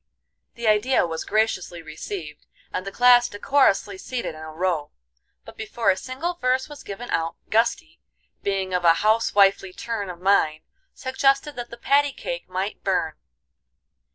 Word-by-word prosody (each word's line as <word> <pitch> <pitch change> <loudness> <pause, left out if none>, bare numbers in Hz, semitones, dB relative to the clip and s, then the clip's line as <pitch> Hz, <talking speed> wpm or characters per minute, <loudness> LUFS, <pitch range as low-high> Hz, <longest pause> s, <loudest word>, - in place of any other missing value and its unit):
The 235 -1 -3
idea 215 +4 +3
was 165 -1 -4
graciously 205 -6 -1
received, 155 0 -7 0.3
and 185 - -3
the - - -3
class 245 +2 +5
decorously 205 -4 +2
seated 245 -6 -4
in 155 - -11
a 155 0 -8
row. 165 -2 -1 0.6
But - - -12
before 220 -1 +1
a - - 0
single 265 - -4
verse 255 +2 +1
was 295 -1 -11
given 230 +5 -7
out, 165 0 -1 0.2
Gusty, 240 +9 +1 0.4
being 195 -2 -1
of 180 -1 0
a 165 -1 +6
house 220 0 +2
wifely 195 -1 +4
turn 215 -3 -4
of 175 -1 -8
mind, 175 -5 +2 0.3
suggested 275 +2 +1
that 240 -1 -6
the 235 - -10
patty 285 +3 +2
cake - - -6
might 190 +3 -4
burn. 180 -5 0
205 Hz, 155 wpm, -24 LUFS, 180-250 Hz, 0.6 s, a